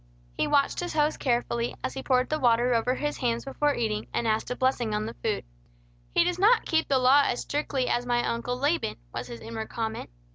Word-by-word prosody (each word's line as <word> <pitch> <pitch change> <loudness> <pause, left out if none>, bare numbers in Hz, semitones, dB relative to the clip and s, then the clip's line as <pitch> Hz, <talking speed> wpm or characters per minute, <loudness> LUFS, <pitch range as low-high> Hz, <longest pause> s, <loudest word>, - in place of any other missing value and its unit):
He - - 0
watched 280 -1 +2
his 350 0 -3
host 300 0 +1
carefully, 240 -2 0
as - - -2
he 265 - -5
poured 255 -1 +2
the 310 - 0
water 240 -1 +3
over 245 +2 +1
his 295 +1 -2
hands 235 -1 -1
before 290 +1 0
eating, 215 -2 -2
and 235 - -1
asked 220 0 0
a 250 - -2
blessing 250 -5 0
on 210 0 -1
the 225 - -5
food. 220 -2 -1 0.7
"He - - +6
does 360 0 -1
not 440 +5 +4
keep 320 0 +1
the 275 - +3
law 260 +3 +6
as 245 - -1
strictly 280 -3 -1
as 240 - +1
my 240 -1 0
Uncle 245 +1 -2
Laban," 285 - 0 0.2
was 120 +1 -4
his 120 -1 -9
inward 225 -1 -6
comment. 225 -1 -4
245 Hz, 220 wpm, -27 LUFS, 230-285 Hz, 0.7 s, He